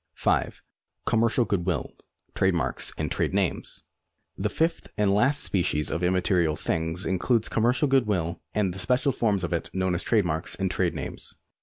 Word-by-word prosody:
5. - - 0 0.4
Commercial 115 +2 +2
good 100 -4 0
ivill; 90 0 -2 0.4
trade 95 -1 +2
marks 65 -7 +1
and - - -2
trade - - 0
names. - - -1 0.5
The 105 +2 -1
fifth 165 +9 -1
and 105 -2 +3
last 135 +8 +3
species 75 -5 0
of 85 - -2
immaterial 90 -3 +2
things 80 +4 -2
includes 110 +5 +1
com 115 - 0
mercial 125 +4 +2
good 135 -4 +3
will 85 -5 -1
and 100 -4 0
the 95 - -8
special 130 +5 +2
forms 105 -6 0
of 85 - -2
it 85 - -1
known 95 -1 +1
as 85 - 0
trade 110 -5 +2
marks 80 0 -1
and 95 -1 -1
trade 90 -2 0
names. - - -5
95 Hz, 180 wpm, -26 LUFS, 85-110 Hz, 0.5 s, and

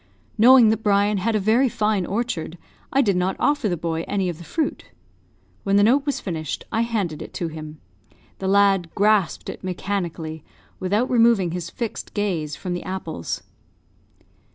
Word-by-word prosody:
Knowing 240 0 +7
that 220 0 +1
Brian 205 -1 +2
had 220 +4 0
a - - +3
very 230 +6 +3
fine 210 -5 0
orchard, 195 -6 -3 0.3
I 275 +1 +3
did 200 -5 +2
not 180 +1 0
offer 290 -7 +1
the 175 - -1
boy 165 0 -2
any 195 -3 0
of 170 -2 -6
the - - -9
fruit. 315 - -2 0.8
When 195 0 +1
the 205 - +5
note 275 +7 +3
was 285 - 0
finished, 160 -6 -4
I 225 - +1
handed 205 -10 -2
it - - -9
to 170 - -2
him. 155 -1 -9 0.6
The 190 - -3
lad 195 -3 +3
grasped 205 -4 +2
it - - -7
mechanically, 175 -4 -4 0.4
without 205 +7 +1
removing 230 -7 +4
his 170 -1 -4
fixed 235 +3 -5
gaze 175 -8 -1
from 180 - -4
the 175 - -3
apples. 170 - -5
195 Hz, 170 wpm, -23 LUFS, 175-220 Hz, 0.8 s, Knowing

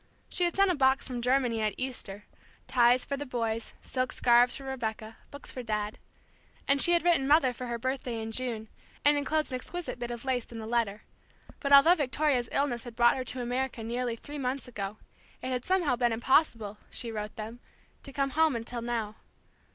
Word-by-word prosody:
She 355 - +2
had 345 - -1
sent 390 -1 +4
a - - 0
box 265 -1 +3
from 250 -2 -4
Germany 250 -2 +2
at 215 -1 0
Easter, 220 -6 -4 0.4
ties 245 0 +4
for 280 - -3
the 290 - -5
boys, 230 -2 -3
silk 255 -1 -2
scarves 240 0 +4
for 275 - -7
Rebecca, 225 -4 -4
books 285 - -7
for 255 - -5
Dad; 210 -2 -3 0.7
and 275 0 +4
she 345 - +6
had 340 - +3
written 335 -6 +3
Mother 285 -4 +4
for 250 +1 -6
her 235 0 -2
birthday 255 -1 -3
in 220 0 -4
June, 225 -2 -3 0.4
and 290 0 +6
enclosed 305 +1 0
an 255 - -1
exquisite 295 -2 -6
bit 240 0 -4
of 240 +1 -6
lace 250 -3 -1
in 230 - -7
the 220 - -6
letter; 220 -3 -1 0.6
but 280 - -2
although 280 +5 +9
Victoria's 285 -5 +1
illness 270 -4 0
had 240 -2 -9
brought 240 0 +5
her 255 - -3
to 250 0 -1
America 245 -1 -2
nearly 240 +1 -2
three 290 +5 -8
months 260 +1 -2
ago, 205 -3 -5 0.4
it - - -5
had 250 -1 -1
somehow 355 -9 +2
been 240 -1 +1
impossible, 225 -4 +1
she 235 -2 -4
wrote 210 -1 -5
them, 225 +2 -7 0.4
to 275 - -10
come 275 0 -1
home 315 -2 +3
until 235 +1 -4
now. 230 -3 -3
250 Hz, 200 wpm, -29 LUFS, 230-275 Hz, 0.7 s, although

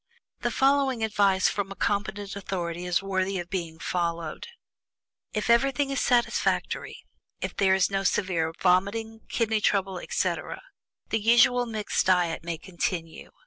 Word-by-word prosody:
The - - -1
following 270 -3 +2
general 220 -1 0
advice 195 -2 +3
from 200 -1 -2
a - - -6
competent 200 -1 -2
authority 180 -3 -4
is 180 +2 +1
worthy 190 0 -1
of 175 -1 -6
being 170 -4 -3
followed: 170 -2 -3 0.8
"If 210 - -2
everything 275 +4 +3
is 275 - 0
satisfactory, 240 -2 0 0.4
if - - -4
there 190 -1 +3
is 190 +1 +2
no 195 0 0
severe 175 -4 0
vomiting, 205 +5 +1
kidney 220 -2 0
trouble, 195 -3 +1
etc., - - -2 0.5
the 225 - +1
usual 240 +2 +4
mixed 215 -4 -1
diet 175 -3 +2
may 170 -1 -3
continue. 170 -1 -4
195 Hz, 145 wpm, -27 LUFS, 180-220 Hz, 0.8 s, usual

